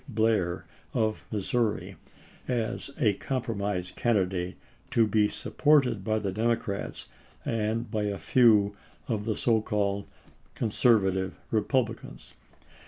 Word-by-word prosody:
Blair 110 -6 +1 0.3
of 110 -1 0
Missouri 110 +2 -1 0.5
as 120 0 -2
a 105 -4 +4
compromise 100 -6 -2
candidate 95 -6 0 0.3
to 115 - +4
be 105 -1 +3
sup - - -7
ported 135 -9 +4
by 110 +1 +1
the 100 -3 -2
Democrats 110 -1 -2 0.4
and 115 +1 -1
by 105 -2 0
a 100 -1 -2
few 105 +1 +4 0.3
of 105 -3 -2
the 110 -2 0
so 115 0 +2
called 100 -2 -1 0.5
Conservative 100 -5 +2 0.2
Republicans. 115 +1 -1
110 Hz, 110 wpm, -28 LUFS, 100-115 Hz, 0.5 s, a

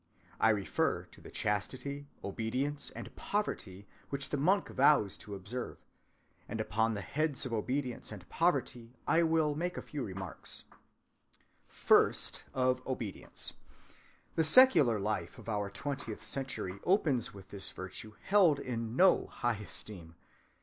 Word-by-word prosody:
I 110 - +5
refer 105 -3 +1
to - - -16
the - - -11
chastity, 130 +7 -2 0.2
obedience, 130 +8 -2
and - - -9
poverty 105 - -3 0.2
which 140 0 -2
the 145 - +1
monk 185 +8 +2
vows 135 -7 +4
to 100 - -7
observe; 105 +6 -5 0.7
and 110 - -3
upon 110 +1 +1
the 100 - -3
heads 150 - -1
of 125 - -4
obedience 125 +3 -2
and 95 -4 -9
poverty 125 -7 0
I 165 - +4
will 160 -2 +3
make 175 +4 -2
a - - -2
few 150 - -5
remarks. 95 -4 -5
‐‐‐‐‐‐‐‐‐‐‐‐‐‐‐‐‐‐‐‐‐‐‐‐‐‐‐‐‐‐‐‐‐‐‐‐‐ - - -32
First, - - +3
of 130 0 +1
Obedience. 120 -6 -3 0.8
The 160 - +2
secular 155 - +7
life 105 +2 -2
of - - -12
our 105 -2 -1
twentieth 135 0 -4
century 125 -8 -4
opens 160 - +2
with 95 -2 -12
this 100 -1 -1
virtue 105 +3 -7
held 190 -7 +5
in 115 -2 -3
no 185 +5 +5
high 120 -2 -1
esteem. 95 -5 -5
125 Hz, 140 wpm, -33 LUFS, 105-145 Hz, 0.8 s, secular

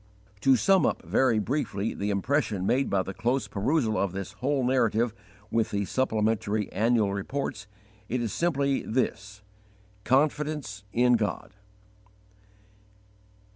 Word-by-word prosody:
To 135 +5 +5
sum 190 +9 +4
up - - 0
very 130 -4 +2
briefly 110 -2 -1
the 100 - -3
impression 105 -1 0
made 135 +6 +1
by 95 -1 +1
the 95 - -6
close 115 +3 -1
perusal 110 +3 0
of 100 -3 -1
this 100 0 -5
whole 130 +7 -1
narrative 120 -3 +2 0.4
with 115 -1 +1
the 100 0 -1
supplementary 110 -3 0
annual 110 -2 +2
reports, 110 +2 -4 0.4
it 125 - 0
is 115 -3 -2
simply 140 -5 +1
this: 100 -4 -3 0.6
CONFIDENCE 145 -6 0
IN 125 +1 +4
GOD. 105 -2 -3
115 Hz, 125 wpm, -27 LUFS, 100-135 Hz, 0.6 s, To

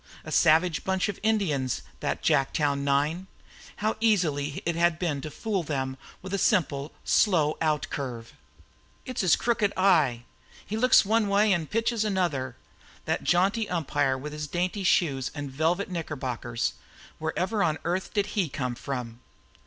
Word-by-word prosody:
A 155 - -8
savage 160 +2 +3
bunch 190 +2 0
of 200 - -5
Indians, 180 - 0 0.2
that - - -2
Jacktown 140 +1 +2
nine! 145 +6 0 0.5
How 215 +1 -1
easy 155 -10 +1
it 170 0 0
had 170 -1 +2
been 160 -6 -2
to 155 - -5
fool 200 +5 -2
them 135 -4 -3 0.3
with 190 +1 -6
a 200 - 0
simple, 150 -8 +1
slow 160 -8 +3
outcurve! 140 -6 -2 0.7
"It's 255 -2 -3
his 185 -4 +5
crooked 225 -4 +1
eye! 155 -11 +3 0.4
He 215 - -4
looks 250 -1 +5
one 220 +1 +2
way 200 +1 +4
an' 165 -4 -1
pitches 230 +2 0
another!" 170 - -1 0.5
That - - -1
jaunty 200 +5 +2
umpire 145 -5 0
with 150 +3 -7
his 150 0 -4
dainty 180 +5 -2
shoes 140 -8 +2
and 145 -2 -5
velvet 165 +8 0
knickerbockers, 130 -9 -3 0.5
wherever 185 +7 -1
on 155 -3 +2
earth 180 +3 -2
did 205 -2 +1
he 190 -7 0
come 125 -3 -3
from? 120 -2 -5
165 Hz, 150 wpm, -27 LUFS, 140-195 Hz, 0.7 s, his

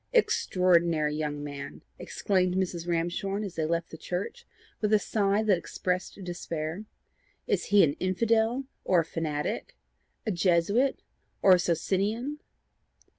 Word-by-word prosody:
"Extraordinary 170 - +3
young 150 -1 -3
man!" 145 -1 -7 0.2
exclaimed 185 -2 0
Mrs. 175 -2 -2
Ramshorn 175 +4 -1
as 195 -4 -5
they 160 - -1
left 170 0 -1
the - - -9
church, 200 - -4 0.3
with 210 -1 +1
a - - +8
sigh 205 0 +1
that 200 -5 +3
expressed 180 +1 -3
despair. 170 +1 -4 0.6
"Is - - 0
he 205 -1 +5
an 145 - +3
infidel 225 +6 +1 0.2
or 180 -2 +4
a - - -6
fanatic? 150 - -3 0.5
a 215 - 0
Jesuit 190 +8 +2 0.4
or 195 - +7
a 180 - +5
Socinian?" 205 - -1
180 Hz, 130 wpm, -28 LUFS, 165-205 Hz, 0.6 s, a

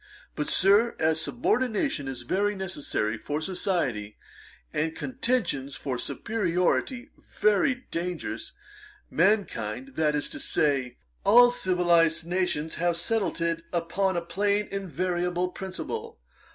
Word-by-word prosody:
But, 150 - -2
Sir, 205 +5 +4
as 160 0 +2
subordination 245 - 0
is 130 -2 -5
very 205 +10 0
necessary 145 - -2
for 145 +6 -3
society, 155 - -2 0.6
and 160 +1 -1
contensions 230 - -1
for 130 -4 -3
superiority 180 - -1 0.3
very 245 +5 +3
dangerous, 175 -1 -4 0.6
mankind, 135 - +1
that 155 -1 +2
is 150 - 0
to - - -6
say, 135 -5 0 0.3
all 245 +3 +7
civilized 175 -6 +2
nations, 170 -3 -1
have 175 -1 +2
settled 200 -1 0
it 165 0 0
upon 175 +2 0
a 170 - -1
plain 205 +3 +1
invariable 180 -1 -1
principle. 185 - -6
175 Hz, 110 wpm, -27 LUFS, 150-200 Hz, 0.6 s, all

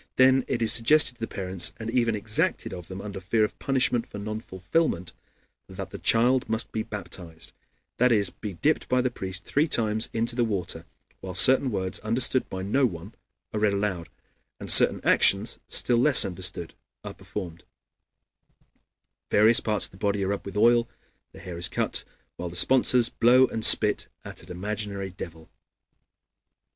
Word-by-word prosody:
Then 130 0 +4
it 120 - -2
is 110 0 +5
suggested 125 +3 +4
to 120 - -29
the 115 - -4
parents, 95 -2 -2
and 110 - -7
even 115 -2 +1
exacted 105 +1 0
of 90 -2 -9
them, 95 +1 -8
under 100 -2 -8
fear 110 +4 0
of 105 - -3
punishment 130 -3 0
for - - -10
non 110 +1 -5
fulfillment, 95 - -2 0.6
that - - -8
the - - -8
child 125 +3 +2
must 110 +1 -3
be 110 - -3
baptized; 90 -6 -8 0.5
that 125 +1 +3
is, 100 -5 +2
be 105 -3 -8
dipped 150 - -1
by 125 - +2
the 125 0 0
priest 95 -3 -7
three 150 +3 +1
times 110 -4 0
into 115 +1 -1
the 120 - +1
water, 90 -6 -3 0.3
while 95 -2 -8
certain 130 +6 +4
words, 95 -4 -3
understood 125 +3 +1
by 95 0 -6
no 130 +8 0
one, 90 +2 -9 0.4
are 105 - -2
read 105 -1 +1
aloud, 95 -5 -3 0.5
and - - -1
certain - - +6
actions, 100 +4 +3
still 120 - 0
less 135 -3 +5
understood, 90 -2 -6 0.3
are - - -7
performed; 85 -5 -8 1.7
various 110 +3 +5
parts 105 -2 0
of - - -5
the 95 - -16
body 100 0 -1
are - - -2
rubbed 100 0 -4
with 100 +1 -7
oil, 120 +2 +4
and - - -39
the - - -13
hair 90 -2 -8
is 85 - +1
cut, - - -1 0.3
while 90 0 -5
the 85 - -11
sponsors 125 +3 +4
blow 125 +2 +4
and 110 -3 -5
spit - - +4 0.2
at - - -9
an - - -16
imaginary 100 +1 -5
devil. 80 -3 -10
105 Hz, 175 wpm, -25 LUFS, 95-120 Hz, 1.7 s, certain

